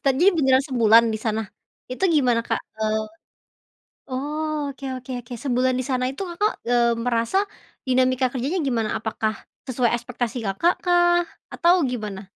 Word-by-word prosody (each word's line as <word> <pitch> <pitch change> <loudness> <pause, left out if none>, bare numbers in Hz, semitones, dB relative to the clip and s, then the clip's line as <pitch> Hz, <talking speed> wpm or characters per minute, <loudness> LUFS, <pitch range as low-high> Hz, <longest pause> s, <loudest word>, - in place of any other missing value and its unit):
Jadinya 275 +8 +4
beneran 265 -2 +4
sebulan 230 -2 +5
di - - -3
sana 220 -1 0 0.5
itu 255 +10 -2
gimana, 245 -5 +3
Kak? 225 - 0 0.2
Eee, 215 0 0 1.1
oh, 300 +4 -3 0.2
oke 275 0 -9
oke 255 +1 -9
oke, 240 +1 -10
sebulan 255 -1 +1
di 255 - -2
sana 255 -1 0
itu 275 - -8
Kakak, 415 +6 0 0.2
eee, 235 -1 +3
merasa 235 +7 +1 0.5
dinamika 255 0 +2
kerjanya 275 +8 -2
gimana? 225 -4 0
Apakah 220 0 -2 0.3
sesuai 245 -2 +1
ekspektasi 240 0 -4
Kakak 265 - +2
kah? 350 0 +4 0.3
Atau 345 +1 +4 0.2
gimana? 210 -5 -5
255 Hz, 145 wpm, -23 LUFS, 230-280 Hz, 1.1 s, sebulan